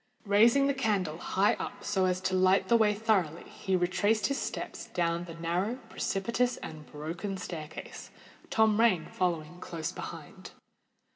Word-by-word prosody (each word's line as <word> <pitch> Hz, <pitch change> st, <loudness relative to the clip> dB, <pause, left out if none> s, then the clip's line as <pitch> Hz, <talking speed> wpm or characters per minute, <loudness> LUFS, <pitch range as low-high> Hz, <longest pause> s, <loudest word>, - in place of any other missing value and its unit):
Raising 230 Hz, +7 st, +5 dB
the 280 Hz, -, +2 dB
candle 200 Hz, -, 0 dB
high 195 Hz, +3 st, +2 dB
up -, -, -6 dB
so 190 Hz, -1 st, +1 dB
as 180 Hz, 0 st, +1 dB
to 185 Hz, -, -1 dB
light 185 Hz, +1 st, +3 dB
the 235 Hz, -, +6 dB
way 215 Hz, -2 st, +4 dB
thoroughly, 195 Hz, -7 st, +1 dB
he 190 Hz, -, -2 dB
retraced 185 Hz, +5 st, +2 dB
his 275 Hz, -, 0 dB
steps -, -, -5 dB
down 170 Hz, -1 st, -1 dB
the 165 Hz, -2 st, -9 dB
narrow, 175 Hz, +7 st, -1 dB, 0.2 s
precipitous, 235 Hz, +5 st, 0 dB
and 155 Hz, -1 st, -9 dB
broken 170 Hz, +6 st, -5 dB
staircase, 160 Hz, -4 st, -7 dB, 0.4 s
Tom 220 Hz, -1 st, +3 dB
Rain 210 Hz, -8 st, +4 dB
following 175 Hz, -2 st, -2 dB
close 165 Hz, -3 st, -4 dB
behind. -, -, -9 dB
185 Hz, 150 wpm, -30 LUFS, 170-215 Hz, 0.4 s, the